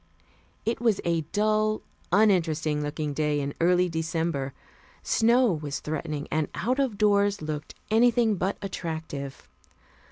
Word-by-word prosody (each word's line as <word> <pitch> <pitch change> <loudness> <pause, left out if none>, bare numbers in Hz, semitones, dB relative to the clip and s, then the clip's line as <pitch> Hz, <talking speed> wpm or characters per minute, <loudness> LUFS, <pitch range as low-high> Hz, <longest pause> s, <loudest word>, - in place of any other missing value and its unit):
It 230 +1 -1
was 225 -4 +2
a 170 -1 +1
dull, 215 +1 +1 0.3
uninteresting 165 -7 +3
looking 150 0 -3
day 150 0 0
in 140 0 -3
early 180 +1 +4
December. 160 -4 -2 0.5
Snow 235 +1 +4
was 150 -3 -4
threatening 150 -1 -4
and 155 -1 +1
out 250 +9 0
of 260 -7 0
doors 205 -1 +3
looked 150 0 -5 0.2
anything 230 0 +4
but 190 +3 -1
attractive. 160 -7 -5
170 Hz, 125 wpm, -27 LUFS, 150-215 Hz, 0.5 s, early